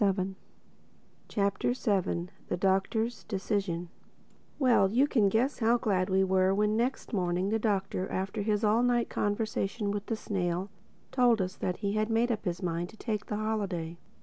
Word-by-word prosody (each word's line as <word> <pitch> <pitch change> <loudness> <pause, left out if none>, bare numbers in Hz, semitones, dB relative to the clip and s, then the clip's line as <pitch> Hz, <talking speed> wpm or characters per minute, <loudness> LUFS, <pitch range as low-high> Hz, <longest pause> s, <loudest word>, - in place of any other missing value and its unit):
THE 205 - +5
SEVENTH 190 0 -1 0.9
CHAPTER 200 +3 0 0.7
THE 180 - -1
DOCTOR'S 195 +5 0
DECISION 190 -4 -2 0.7
WELL, 245 -8 +4
you 250 +7 +4
can 225 -9 +3
guess 245 +8 +1
how 235 +1 +4
glad 195 -5 0
we 190 0 +3
were 190 0 +3
when 210 +1 +2
next 240 +2 -1
morning 180 -1 0
the 225 +1 +1
Doctor, 195 -3 -1
after 190 +3 -2
his 210 +1 0
all 215 +2 +4
night 245 -1 +2
conversation 205 0 -1
with 205 0 -4
the 225 - 0
snail, 185 -2 -2 0.4
told 245 -3 +4
us 185 -1 -2
that 180 - -2
he 200 - +1
had 215 +1 0
made 230 +2 +2
up 215 -1 -3
his 175 +1 -2
mind 170 0 -2
to 220 - -15
take 215 -3 -3
the 210 - -2
holiday. 195 -6 -2
205 Hz, 170 wpm, -30 LUFS, 190-225 Hz, 0.9 s, THE